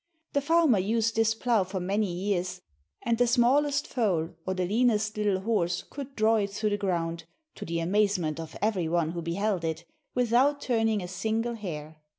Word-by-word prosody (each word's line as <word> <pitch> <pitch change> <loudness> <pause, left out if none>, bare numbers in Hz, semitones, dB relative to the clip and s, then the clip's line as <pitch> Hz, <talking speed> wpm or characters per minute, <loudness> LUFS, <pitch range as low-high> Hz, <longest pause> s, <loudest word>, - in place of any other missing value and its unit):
The 280 - +2
farmer 320 - +4
used 225 +3 0
this 225 0 +2
plough 225 -3 +2
for 190 +1 -4
many 195 +2 0
years, 185 0 -2 0.4
and 230 0 0
the 245 - +4
smallest 280 +4 +3
foal 185 -10 0 0.2
or 185 - 0
the 185 -1 0
leanest 215 +1 +1
little 205 -3 0
horse 185 -5 0
could 280 -1 -8
draw 220 +1 +3
it 200 -2 0
through 210 +2 -1
the 205 - +1
ground, 170 -4 -2 0.3
to - - -8
the 170 0 -2
amazement 185 -4 +1
of 165 -1 -7
every 200 -6 +1
one 165 -1 +1
who 170 0 -4
beheld 180 +2 -1
it, 165 +1 -3 0.3
without 250 +4 +3
turning 225 -6 +1
a - - -5
single 220 +6 -1
hair. 160 -8 -6
205 Hz, 180 wpm, -28 LUFS, 175-230 Hz, 0.4 s, farmer